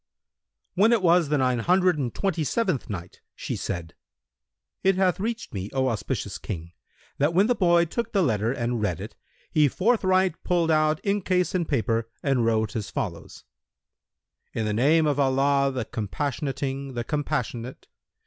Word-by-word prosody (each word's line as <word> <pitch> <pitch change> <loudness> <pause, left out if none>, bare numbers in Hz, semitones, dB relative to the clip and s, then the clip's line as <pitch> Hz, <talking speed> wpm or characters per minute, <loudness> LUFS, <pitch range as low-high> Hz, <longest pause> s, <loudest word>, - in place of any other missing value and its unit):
When 205 +5 +4
it 220 -5 +2
was 170 -3 +4
the 150 - +2
Nine 125 -2 +1
Hundred 180 +3 +3
and 125 -4 -1
Twenty 185 -5 -1
seventh 185 - -1
Night, 90 -3 -7
She - - -4
said: 85 -3 -5 0.9
It 195 0 +4
hath 185 -2 +2
reached 230 +3 -3
me, 95 0 -4
O 130 -1 +1
auspicious 115 -3 -3
King, 85 -1 -6 0.5
that 150 +4 +2
when 195 +3 +5
the 245 - +3
boy 175 -5 +3
took 235 +8 -3
the 195 -3 +2
letter 110 -5 +1
and 120 -3 -2
read 90 -6 -1
it, 105 +4 -7 0.4
he 150 -2 +4
forthright 185 - +1
pulled 170 -2 +1
out 155 0 +2
inkcase 185 -3 +1
and 175 -3 -1
paper 115 -4 0
and 135 -4 +2
wrote 110 +1 +1
as 105 -3 -3
follows:—"In 110 - -9
the 105 - -1
name 150 +8 +3
of 145 -1 +1
Allah 140 0 +2
the 125 -4 -3
Compassionating, 135 +4 -3
the 120 - -2
Compassionate! 130 -4 -3
140 Hz, 160 wpm, -25 LUFS, 120-180 Hz, 0.9 s, when